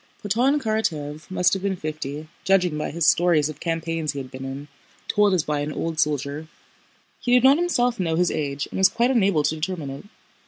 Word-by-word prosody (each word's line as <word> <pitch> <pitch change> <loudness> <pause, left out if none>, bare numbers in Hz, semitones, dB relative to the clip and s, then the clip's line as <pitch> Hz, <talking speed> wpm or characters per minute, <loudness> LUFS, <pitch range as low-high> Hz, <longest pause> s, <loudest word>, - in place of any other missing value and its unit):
Platón 245 +8 +2
Karatáev 155 - -2
must 180 -1 +2
have 195 - -1
been 195 -1 -1
fifty, 155 -2 -5 0.2
judging 180 -4 +2
by 150 - -3
his 165 0 0
stories 165 -4 +4
of 155 -1 -8
campaigns 165 -2 -2
he - - -8
had 130 -2 -6
been 130 0 -7
in, 135 +2 -6 0.4
told 210 -1 +3
as 180 -4 +2
by 150 -2 -1
an 145 +1 -3
old 160 +1 -3
soldier. 150 0 -1 0.7
He 245 - 0
did 250 -1 +5
not 270 +2 +7
himself 245 - +1
know 165 -3 0
his 180 +1 +2
age 140 -2 -2
and - - -4
was 190 - +6
quite 240 +2 +1
unable 200 - +2
to 155 - +1
determine 160 -2 -4
it. 140 +7 -9
165 Hz, 205 wpm, -23 LUFS, 150-195 Hz, 0.7 s, not